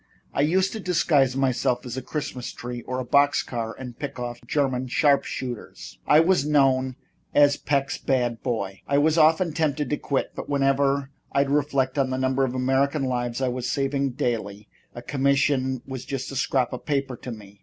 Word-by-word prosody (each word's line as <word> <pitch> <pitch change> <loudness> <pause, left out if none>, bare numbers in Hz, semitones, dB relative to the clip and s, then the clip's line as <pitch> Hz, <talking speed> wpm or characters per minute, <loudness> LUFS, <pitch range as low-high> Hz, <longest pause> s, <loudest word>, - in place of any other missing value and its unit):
I - - +1
used 185 +6 +2
to 220 - -5
disguise 150 -8 +2
myself 130 -1 +1
as 120 -1 -5
a 130 - -3
Christmas 130 -2 -5
tree 120 0 -6
or 130 - -2
a 130 - -3
box 145 +3 +3
car 115 -2 -4
and 125 -2 -9
pick 140 -2 -5
off 120 -1 -5
German 130 -2 0
sharp 140 +2 +3
shooters. 125 -4 -7
I 150 - +7
was 175 -3 +3
known 135 -3 +2 0.4
as 145 -1 +6
Peck's 140 -2 -1
Bad 120 -3 0
Boy. 100 -6 -3
I 140 - +2
was 155 +3 +3
often 160 +2 +4
tempted 150 -3 -1
to 150 - +1
quit, 140 - -2
but - - -7
whenever 140 0 +1 0.2
I'd 140 0 +2
reflect 140 -2 +1
on 135 -1 +2
the 130 - -2
number 130 +1 +1
of 130 -1 -1
American 135 +3 +1
lives 120 -1 -2
I 130 - +2
was 125 0 -3
saving 140 -1 0
daily, 105 -4 -3 0.3
a 120 - -8
commission 135 -1 +1
was 130 -2 -6
just 135 -1 -4
a - - -7
scrap 130 -1 0
of 125 - -7
paper 135 -3 -1
to 125 - -7
me." 100 -3 -11
135 Hz, 190 wpm, -25 LUFS, 125-140 Hz, 0.4 s, I